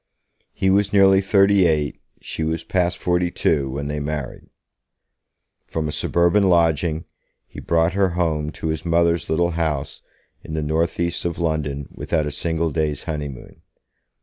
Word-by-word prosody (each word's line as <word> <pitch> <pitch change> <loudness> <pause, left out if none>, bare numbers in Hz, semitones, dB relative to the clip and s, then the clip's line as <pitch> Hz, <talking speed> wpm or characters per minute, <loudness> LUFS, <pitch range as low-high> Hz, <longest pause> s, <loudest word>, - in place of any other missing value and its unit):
He 95 - +2
was 100 +1 +2
nearly 95 -1 +5
thirty 100 -1 +4
eight, 75 -4 -1 0.2
she 80 - -5
was 80 +1 -2
past 90 -2 0
forty 90 0 0
two, 70 -5 0
when 70 +2 -4
they 75 0 -3
married. 75 -2 -5 1.2
From 80 -1 -3
a - - -3
suburban 85 +6 +2
lodging, 85 -2 +2 0.4
he - - -11
brought 85 +1 +1
her 100 -1 +2
home 80 -3 0
to 80 - -4
his 80 -1 -3
mother's 85 0 +1
little 85 +2 +1
house 75 -4 -2 0.4
in 80 - -6
the 80 - -1
northeast 85 +2 -1
of 85 -1 -2
London 75 -4 -2
without 80 -3 -1
a 75 - -3
single 80 +2 -1
day's 75 -1 -1
honeymoon. 75 -5 -6
80 Hz, 150 wpm, -22 LUFS, 75-85 Hz, 1.2 s, nearly